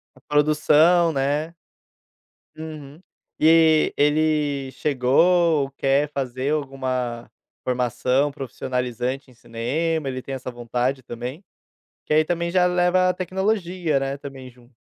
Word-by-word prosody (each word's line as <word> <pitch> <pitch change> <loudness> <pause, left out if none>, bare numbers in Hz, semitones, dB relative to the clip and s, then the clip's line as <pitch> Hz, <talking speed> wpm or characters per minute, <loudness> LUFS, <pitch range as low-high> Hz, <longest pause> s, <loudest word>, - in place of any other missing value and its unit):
A - - -21
produção, 155 +3 +3
né. 145 +3 -1 1.0
Uhum. 155 -1 -9 0.4
E 160 -1 +5
ele 150 -2 +1
chegou, 150 +3 +2
quer 140 +2 +1
fazer 135 +1 -2
alguma 130 -4 -3 0.3
formação 125 +3 0
profissionalizante 125 -1 -4
em - - -19
cinema, 135 +7 -2
ele 130 -1 -4
tem 135 +1 -6
essa 130 -1 -6
vontade 125 +2 -2
também? 125 - -7 0.6
Que - - -3
aí 155 +1 +4
também 170 +1 -2
já 180 0 +3
leva 180 +1 +2
a 180 - +1
tecnologia, 185 -3 -1
né, 135 +1 -3
também 135 -2 -9
junto. 120 0 -23
140 Hz, 115 wpm, -23 LUFS, 130-160 Hz, 1.0 s, E